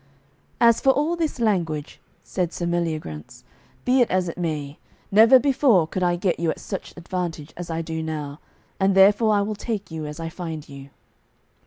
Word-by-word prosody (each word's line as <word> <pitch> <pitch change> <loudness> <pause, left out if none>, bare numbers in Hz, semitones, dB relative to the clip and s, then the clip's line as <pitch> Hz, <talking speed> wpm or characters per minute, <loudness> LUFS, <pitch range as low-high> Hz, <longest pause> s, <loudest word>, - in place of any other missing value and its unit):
"As 235 -1 +5
for 270 - +3
all 295 +6 +2
this 320 -6 -2
language," 170 -9 -1 0.2
said 180 -3 -2
Sir 175 - -4
Meliagrance, 160 - -3 0.4
"be 255 +1 +4
it 240 - +3
as 185 -1 +1
it 165 - -5
may, 155 -4 -4 0.3
never 225 +6 +8
before 255 - +3
could 185 +4 -4
I 175 -1 +2
get 175 0 -1
you 170 -1 0
at - - -3
such 195 -3 -7
advantage 170 -3 -5
as 175 -1 -7
I 165 0 -2
do 160 0 -4
now, 150 -2 -5 0.4
and 195 0 +2
therefore 205 +3 +5
I 205 - +3
will 215 +1 -2
take 205 -3 -5
you 160 -2 -5
as 150 +2 -8
I 165 - -4
find 165 -2 -6
you." 140 -1 -11
175 Hz, 185 wpm, -23 LUFS, 160-210 Hz, 0.4 s, never